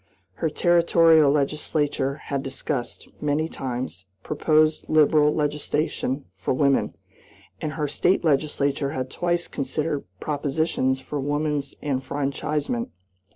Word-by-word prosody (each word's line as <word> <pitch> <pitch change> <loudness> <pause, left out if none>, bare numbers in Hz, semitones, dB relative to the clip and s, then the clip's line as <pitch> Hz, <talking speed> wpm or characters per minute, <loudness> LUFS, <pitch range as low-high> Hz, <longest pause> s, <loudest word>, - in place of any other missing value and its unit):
Her 160 - +2
Territorial 165 -2 +5
legislature 145 -1 0
had 140 -2 -4
discussed, 135 -2 -4
many 150 +2 +1
times, 125 - -5 0.2
proposed 155 +1 +2
liberal 150 -1 +5
legislation 150 -2 -1
for - - -1
women, 140 0 +2 0.7
and 155 - -2
her 150 -2 -1
State 180 +6 +1
legislature 140 -2 +1
had 130 0 -3
twice 175 0 0
considered 145 +2 -2
propositions 145 -2 0
for 145 +2 -4
woman's 145 0 -1
enfranchisement. 145 - -2
145 Hz, 105 wpm, -24 LUFS, 140-155 Hz, 0.7 s, Territorial